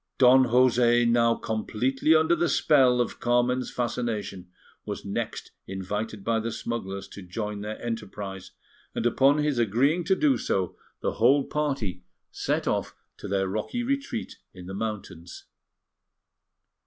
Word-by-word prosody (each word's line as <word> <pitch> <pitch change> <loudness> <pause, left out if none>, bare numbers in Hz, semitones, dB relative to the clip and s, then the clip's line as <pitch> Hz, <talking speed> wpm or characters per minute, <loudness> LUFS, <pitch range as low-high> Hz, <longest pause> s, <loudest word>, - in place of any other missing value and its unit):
Don 130 0 +6
José, 120 -1 +4
now 115 0 +3
completely 125 +7 0
under 160 +2 +4
the 170 0 +1
spell 130 -5 +4
of 120 - -1
Carmen's 120 +1 +1
fascination, 115 -6 -3 0.3
was - - -6
next - - -4 0.2
invited 100 +2 -4
by 115 +1 +1
the 115 +1 -3
smugglers 100 -4 -4
to 100 - -10
join 105 +3 -5
their 105 +1 -5
enterprise, 105 -4 -6 0.5
and - - -2
upon 135 +4 +4
his 150 -4 0
agreeing 130 - +2
to 190 +1 +3
do 275 +4 +2
so, 95 -3 -1 0.3
the - - 0
whole 135 +4 +5
party 135 -14 -2 0.3
set - - -2
off - - -1 0.2
to - - -8
their 95 -1 0
rocky 110 - -3
retreat 275 -2 -3 0.2
in 90 -1 -10
the 95 - -7
mountains. 100 -5 -6
115 Hz, 140 wpm, -26 LUFS, 105-135 Hz, 0.5 s, Don